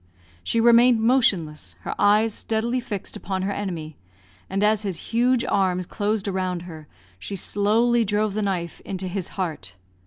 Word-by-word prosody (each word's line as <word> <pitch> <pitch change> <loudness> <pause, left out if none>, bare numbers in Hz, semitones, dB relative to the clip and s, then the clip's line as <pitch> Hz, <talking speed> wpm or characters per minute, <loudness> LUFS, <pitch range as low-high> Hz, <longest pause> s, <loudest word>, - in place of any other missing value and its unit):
She 230 - 0
remained 235 +1 +6
motionless, 180 - +1
her - - -4
eyes 210 +2 +4
steadily 230 +4 -1
fixed 205 -5 -5
upon 190 -1 -3
her 200 - -1
enemy, 170 -7 -5 0.5
and 195 +2 -1
as 210 0 +3
his 195 -5 -3
huge 240 +1 +2
arms 185 -2 +1
closed 210 +1 -2
around 185 -2 -2
her, 160 -4 -10 0.3
she 200 - -6
slowly 225 +5 +2
drove 210 0 0
the 215 - -1
knife 180 -4 -2
into 190 -1 -5
his 185 -1 -3
heart. 155 - -4
200 Hz, 155 wpm, -24 LUFS, 180-220 Hz, 0.5 s, remained